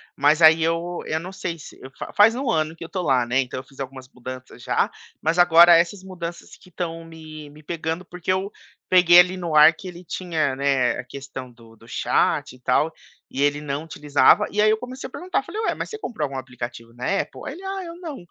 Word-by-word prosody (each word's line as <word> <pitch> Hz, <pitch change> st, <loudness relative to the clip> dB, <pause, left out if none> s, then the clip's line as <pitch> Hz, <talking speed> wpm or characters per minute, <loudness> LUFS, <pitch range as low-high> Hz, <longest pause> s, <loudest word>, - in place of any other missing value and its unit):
Mas 150 Hz, +3 st, +3 dB
aí 160 Hz, 0 st, +7 dB
eu 165 Hz, +2 st, -1 dB
eu 155 Hz, -, -1 dB
não 180 Hz, +4 st, -8 dB
sei 185 Hz, -3 st, -5 dB
se -, -, -12 dB
eu 130 Hz, -, -11 dB
fa -, -, -7 dB
faz 210 Hz, +2 st, +6 dB
1 260 Hz, +1 st, -3 dB
ano 155 Hz, -6 st, 0 dB
que 165 Hz, -, -22 dB
eu -, -, -8 dB
estou 185 Hz, +1 st, -4 dB
lá, 130 Hz, -5 st, +2 dB
né. 125 Hz, +3 st, +1 dB
Então 130 Hz, 0 st, -5 dB
eu -, -, -9 dB
fiz 135 Hz, -, -21 dB
algumas 130 Hz, -1 st, -8 dB
mudanças 130 Hz, -1 st, -10 dB
já, -, -, +1 dB, 0.3 s
mas 160 Hz, +2 st, 0 dB
agora 175 Hz, 0 st, +8 dB
essas 175 Hz, +3 st, 0 dB
mudanças 175 Hz, -3 st, -8 dB
que 185 Hz, -, -19 dB
estão 165 Hz, -1 st, -5 dB
me 155 Hz, -2 st, -11 dB
me 150 Hz, +1 st, -15 dB
pegando. 165 Hz, +2 st, -4 dB
Porque 180 Hz, +1 st, -4 dB
eu 190 Hz, +1 st, -1 dB, 0.4 s
peguei 175 Hz, -1 st, +7 dB
ali 180 Hz, +1 st, +4 dB
no 170 Hz, -3 st, -4 dB
ar 155 Hz, +2 st, +8 dB
que 175 Hz, +4 st, -11 dB
ele 180 Hz, 0 st, -9 dB
tinha, 160 Hz, -6 st, -2 dB
né, 135 Hz, -2 st, +2 dB
a -, -, -4 dB
questão 130 Hz, 0 st, -9 dB
do 115 Hz, -1 st, -18 dB
do 115 Hz, +1 st, -19 dB
chat -, -, 0 dB
e -, -, -19 dB
tal, 135 Hz, +5 st, +1 dB, 0.4 s
e 135 Hz, -, -4 dB
ele 145 Hz, 0 st, +2 dB
não 145 Hz, 0 st, -4 dB
utilizava, 150 Hz, +5 st, +3 dB
e 210 Hz, -, +1 dB
aí 215 Hz, -, +5 dB
eu 215 Hz, -, +3 dB
comecei 255 Hz, +3 st, -7 dB
a -, -, -16 dB
perguntar, 365 Hz, +6 st, -2 dB
eu -, -, -6 dB
falei: 435 Hz, -, -5 dB
"Ué, 445 Hz, -, 0 dB
mas -, -, -5 dB
você 440 Hz, -, -6 dB
comprou 320 Hz, -, -3 dB
algum 135 Hz, -1 st, -6 dB
aplicativo 120 Hz, -2 st, -8 dB
na 125 Hz, +1 st, -7 dB, 0.2 s
Apple?" -, -, -11 dB
Aí 285 Hz, -, -4 dB
ele: 360 Hz, +6 st, -11 dB
"Ah, 385 Hz, 0 st, -4 dB
eu 335 Hz, 0 st, -8 dB
não," 320 Hz, -5 st, -6 dB
160 Hz, 245 wpm, -23 LUFS, 135-185 Hz, 0.4 s, agora